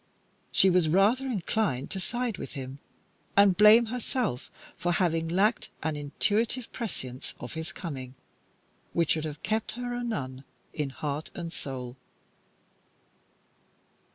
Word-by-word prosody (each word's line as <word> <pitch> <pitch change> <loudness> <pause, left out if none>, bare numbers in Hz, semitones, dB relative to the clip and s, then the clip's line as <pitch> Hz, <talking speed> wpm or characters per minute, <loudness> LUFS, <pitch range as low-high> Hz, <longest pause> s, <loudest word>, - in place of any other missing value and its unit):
She 190 -1 +5
was 175 -3 +4
rather 210 +10 +4
inclined 205 - 0
to 190 - -2
side 240 +2 -2
with - - -6
him, 135 0 -6 0.6
and 200 -2 +7
blame 215 +4 +8
herself 235 - -2 0.3
for 175 0 0
having 165 -3 +1
lacked 200 +7 +2
an 155 0 0
intuitive 215 - 0
prescience 130 - -5
of - - -7
his 160 0 -4
coming, 130 -6 -6 0.8
which 170 -2 +2
should 155 -1 +1
have 150 -1 -6
kept 220 0 -1
her 245 +1 -4
a 245 0 -2
nun 130 - -3 0.3
in 150 -2 -1
heart 145 +2 -4
and 170 -1 -5
soul. 130 -2 -5
175 Hz, 130 wpm, -29 LUFS, 145-220 Hz, 0.8 s, blame